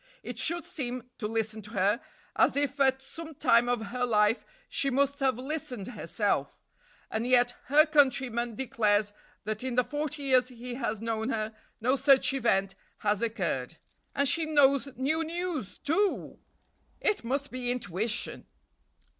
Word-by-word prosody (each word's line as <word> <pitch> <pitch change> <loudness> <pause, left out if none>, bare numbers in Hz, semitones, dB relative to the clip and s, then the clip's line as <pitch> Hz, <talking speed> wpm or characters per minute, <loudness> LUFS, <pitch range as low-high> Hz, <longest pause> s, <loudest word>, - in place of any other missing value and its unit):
It - - -6
should 340 +1 -1
seem, 250 -3 -4
to 210 - -2
listen 220 0 -2
to 210 +2 -11
her, 200 +4 +2 0.3
as - - +4
if 285 0 0
at 265 -1 +3
some 320 +3 -9
time 235 -1 +4
of 240 -2 0
her 250 0 -2
life 215 -1 +3 0.2
she 275 - 0
must 280 +1 +1
have 265 -4 +2
listened 255 -6 -4
herself; 245 - -1 0.5
and 225 +2 -1
yet 245 -1 +4
her 300 +4 +6
countryman 260 -6 +2
declares 210 -5 +1 0.3
that 215 +2 -3
in 260 -2 -2
the 250 - +4
forty 295 +1 -3
years 255 -2 +4
he 245 0 -7
has 235 -4 -3
known 225 0 -2
her, 220 -3 -2 0.3
no 255 +4 +2
such 270 0 +4
event 195 -7 +1 0.2
has 205 0 0
occurred; 170 - -2 0.4
and 280 0 +3
she 315 +3 +3
knows 280 -3 +4
new 310 +5 +1
news, 330 - -4
too! 380 +7 0 0.6
It 420 - 0
must 275 +4 -2
be 250 -1 -3
intuition!... 220 -2 -2
250 Hz, 155 wpm, -29 LUFS, 225-280 Hz, 0.6 s, her